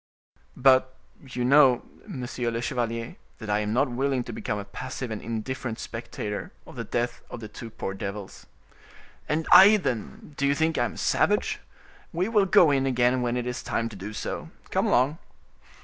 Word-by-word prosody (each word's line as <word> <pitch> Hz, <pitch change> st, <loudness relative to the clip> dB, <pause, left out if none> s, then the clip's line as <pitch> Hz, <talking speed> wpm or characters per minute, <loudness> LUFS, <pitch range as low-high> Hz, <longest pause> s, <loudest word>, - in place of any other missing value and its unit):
"But 130 Hz, 0 st, +4 dB, 0.3 s
you 125 Hz, -2 st, -3 dB
know, 135 Hz, -2 st, +6 dB, 0.2 s
monsieur 125 Hz, -, -3 dB
le 115 Hz, 0 st, -2 dB
chevalier, 115 Hz, -2 st, -3 dB, 0.2 s
that 110 Hz, -2 st, -5 dB
I 105 Hz, -, +2 dB
am 105 Hz, 0 st, -2 dB
not 135 Hz, +6 st, +2 dB
willing 130 Hz, 0 st, 0 dB
to 120 Hz, -, -7 dB
become 105 Hz, -, -3 dB
a 100 Hz, -, -5 dB
passive 125 Hz, +3 st, -6 dB
and 110 Hz, -, -4 dB
indifferent 115 Hz, +1 st, -4 dB
spectator 115 Hz, -3 st, -5 dB
of -, -, -13 dB
the -, -, -4 dB
death 120 Hz, 0 st, -2 dB
of -, -, -7 dB
the 110 Hz, -, -7 dB
two 110 Hz, +2 st, -9 dB
poor 95 Hz, -3 st, -5 dB
devils." 100 Hz, 0 st, -7 dB, 0.8 s
"And 160 Hz, +1 st, 0 dB
I, 205 Hz, +3 st, +9 dB
then—do 140 Hz, -, -3 dB
you 140 Hz, -, +2 dB
think 160 Hz, 0 st, +1 dB
I 120 Hz, -, +3 dB
am -, -, -4 dB
a -, -, -12 dB
savage? -, -, +1 dB, 0.5 s
We 180 Hz, +3 st, 0 dB
will 210 Hz, -4 st, +3 dB
go 170 Hz, -4 st, +6 dB
in 135 Hz, -1 st, +2 dB
again, 125 Hz, 0 st, +2 dB
when 120 Hz, 0 st, 0 dB
it 120 Hz, -, -2 dB
is 125 Hz, 0 st, -3 dB
time 115 Hz, 0 st, -2 dB
to 110 Hz, -, -11 dB
do 100 Hz, +2 st, -7 dB
so. 105 Hz, -, -5 dB, 0.2 s
Come -, -, +1 dB
along!" 135 Hz, +7 st, +2 dB
125 Hz, 185 wpm, -26 LUFS, 115-135 Hz, 0.8 s, I